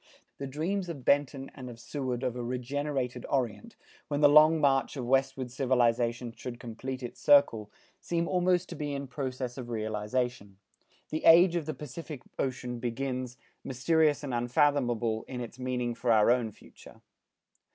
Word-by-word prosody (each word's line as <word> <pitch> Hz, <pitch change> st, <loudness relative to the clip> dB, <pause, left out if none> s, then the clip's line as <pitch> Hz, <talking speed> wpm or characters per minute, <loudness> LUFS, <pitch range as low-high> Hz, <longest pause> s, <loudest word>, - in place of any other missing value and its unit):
The 140 Hz, -, -4 dB
dreams 175 Hz, +7 st, -2 dB
of 140 Hz, -7 st, -7 dB
Benton 140 Hz, -1 st, +1 dB
and 130 Hz, -2 st, -8 dB
of 115 Hz, -1 st, -11 dB
Seward 125 Hz, +1 st, -4 dB
of 125 Hz, -2 st, -1 dB
a 125 Hz, -, -4 dB
regenerated 125 Hz, +1 st, -3 dB
Orient, 120 Hz, -7 st, -2 dB, 0.3 s
when 145 Hz, 0 st, -2 dB
the 145 Hz, -, +8 dB
long 155 Hz, +2 st, +7 dB
march 140 Hz, -1 st, +2 dB
of 125 Hz, -, -3 dB
westward 135 Hz, 0 st, 0 dB
civilization 120 Hz, -2 st, +1 dB
should 120 Hz, -1 st, -7 dB
complete 130 Hz, +3 st, -6 dB
its 120 Hz, -, -8 dB
circle, 115 Hz, -7 st, +4 dB, 0.3 s
seem 170 Hz, -1 st, -1 dB
almost 180 Hz, 0 st, +1 dB
to -, -, -6 dB
be 145 Hz, -2 st, -3 dB
in 140 Hz, 0 st, -4 dB
process 130 Hz, -1 st, -4 dB
of 120 Hz, -2 st, -7 dB
realization. 110 Hz, -1 st, -3 dB, 0.5 s
The 155 Hz, -, -3 dB
age 170 Hz, +2 st, +7 dB
of 165 Hz, -3 st, -2 dB
the 155 Hz, -, -3 dB
Pacific 150 Hz, 0 st, -8 dB, 0.2 s
Ocean 125 Hz, -2 st, -3 dB
begins, 125 Hz, +1 st, -3 dB, 0.3 s
mysterious 150 Hz, +3 st, +2 dB
and 135 Hz, -3 st, -4 dB
unfathomable 120 Hz, -2 st, +1 dB
in 125 Hz, -, -6 dB
its 120 Hz, +1 st, -7 dB
meaning 125 Hz, -1 st, -2 dB
for 115 Hz, +1 st, 0 dB
our 110 Hz, 0 st, +5 dB
own 120 Hz, -3 st, +1 dB
future. -, -, -17 dB
130 Hz, 160 wpm, -29 LUFS, 120-145 Hz, 0.5 s, the